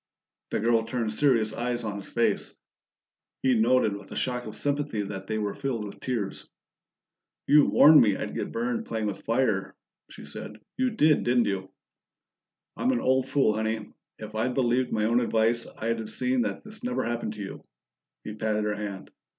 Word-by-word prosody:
The -, -, -1 dB
girl 115 Hz, 0 st, +3 dB
turned 115 Hz, -2 st, -2 dB
serious 115 Hz, -5 st, +2 dB
eyes 120 Hz, +1 st, -2 dB
on 105 Hz, -2 st, -3 dB
his -, -, -11 dB
face; -, -, 0 dB, 0.9 s
he 130 Hz, -1 st, +4 dB
noted 115 Hz, -2 st, +3 dB
with 100 Hz, -1 st, -11 dB
a -, -, -6 dB
shock 125 Hz, -2 st, -2 dB
of 110 Hz, -, -5 dB
sympathy 145 Hz, -6 st, -1 dB
that 95 Hz, -1 st, -7 dB
they 110 Hz, -, -1 dB
were 105 Hz, -1 st, -2 dB
filled 125 Hz, -6 st, -3 dB
with 100 Hz, -, -9 dB
tears. 115 Hz, -7 st, -4 dB, 1.0 s
"You 150 Hz, -1 st, +6 dB
warned 155 Hz, +1 st, +8 dB
me 105 Hz, -4 st, +3 dB
I'd -, -, -4 dB
get -, -, -3 dB
burned 120 Hz, +1 st, -2 dB
playing 110 Hz, -1 st, -2 dB
with 105 Hz, -2 st, -4 dB
fire," 115 Hz, -5 st, 0 dB, 0.3 s
she -, -, -11 dB
said. 105 Hz, -, -8 dB, 0.2 s
"You 260 Hz, 0 st, +1 dB
did, 155 Hz, -10 st, +3 dB
didn't 120 Hz, -1 st, +3 dB
you?" 95 Hz, -1 st, -3 dB, 1.0 s
"I'm 255 Hz, -, +1 dB
an 250 Hz, -, +1 dB
old 130 Hz, 0 st, +1 dB
fool, 135 Hz, -7 st, +3 dB
Honey. 110 Hz, 0 st, -3 dB, 0.2 s
If 110 Hz, 0 st, -9 dB
I'd 115 Hz, +3 st, -1 dB
believed 125 Hz, -1 st, +1 dB
my 105 Hz, -1 st, +1 dB
own 120 Hz, +2 st, +3 dB
advice, 115 Hz, 0 st, +1 dB
I'd 115 Hz, +1 st, -1 dB
have 110 Hz, -, -6 dB
seen 125 Hz, 0 st, 0 dB
that -, -, -3 dB
this 215 Hz, +2 st, -11 dB
never 250 Hz, 0 st, -1 dB
happened 120 Hz, -2 st, -2 dB
to 105 Hz, -, -8 dB
you." 95 Hz, -, -8 dB, 0.6 s
He 105 Hz, -, -6 dB
patted 110 Hz, 0 st, -1 dB
her 105 Hz, 0 st, 0 dB
hand. 100 Hz, -2 st, -6 dB
115 Hz, 185 wpm, -27 LUFS, 105-130 Hz, 1.0 s, warned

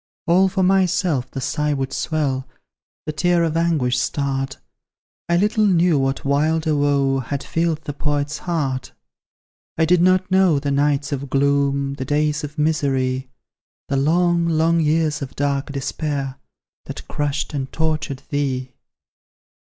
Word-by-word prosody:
All 185 Hz, +3 st, +4 dB
for 190 Hz, 0 st, 0 dB
myself 180 Hz, -8 st, +2 dB
the -, -, -6 dB
sigh 150 Hz, +2 st, -1 dB
would 135 Hz, -1 st, -3 dB
swell, 140 Hz, -5 st, -1 dB, 0.6 s
The -, -, -2 dB
tear 175 Hz, +3 st, +2 dB
of 165 Hz, -1 st, -1 dB
anguish 155 Hz, -7 st, +1 dB
start; 135 Hz, 0 st, -2 dB, 0.7 s
I 170 Hz, -, +3 dB
little 210 Hz, +3 st, +2 dB
knew 175 Hz, -5 st, +3 dB
what 135 Hz, +1 st, -1 dB
wilder 155 Hz, +3 st, +1 dB
woe 140 Hz, -2 st, +2 dB
Had 135 Hz, +2 st, -4 dB
filled 165 Hz, -1 st, -1 dB
the 145 Hz, -, -5 dB
Poet's 145 Hz, +1 st, -2 dB
heart. 145 Hz, -7 st, -2 dB, 0.8 s
I 160 Hz, -, +3 dB
did 175 Hz, +1 st, +3 dB
not 185 Hz, +1 st, +3 dB
know 190 Hz, -5 st, +4 dB
the 140 Hz, 0 st, -2 dB
nights 140 Hz, 0 st, +1 dB
of 140 Hz, -1 st, -3 dB
gloom, 140 Hz, 0 st, +1 dB
The 130 Hz, -1 st, -5 dB
days 150 Hz, +2 st, 0 dB
of 150 Hz, +1 st, -7 dB
misery; 135 Hz, -4 st, 0 dB, 0.6 s
The 135 Hz, -, +1 dB
long, 170 Hz, +4 st, +2 dB
long 165 Hz, +1 st, +2 dB
years 155 Hz, -1 st, +1 dB
of 135 Hz, -1 st, -6 dB
dark 140 Hz, 0 st, -1 dB
despair, 140 Hz, -1 st, -3 dB, 0.5 s
That -, -, -8 dB
crushed 145 Hz, 0 st, -2 dB
and 135 Hz, -2 st, -3 dB
tortured 155 Hz, -4 st, -2 dB
thee. 130 Hz, -3 st, -2 dB
145 Hz, 145 wpm, -21 LUFS, 140-165 Hz, 0.8 s, All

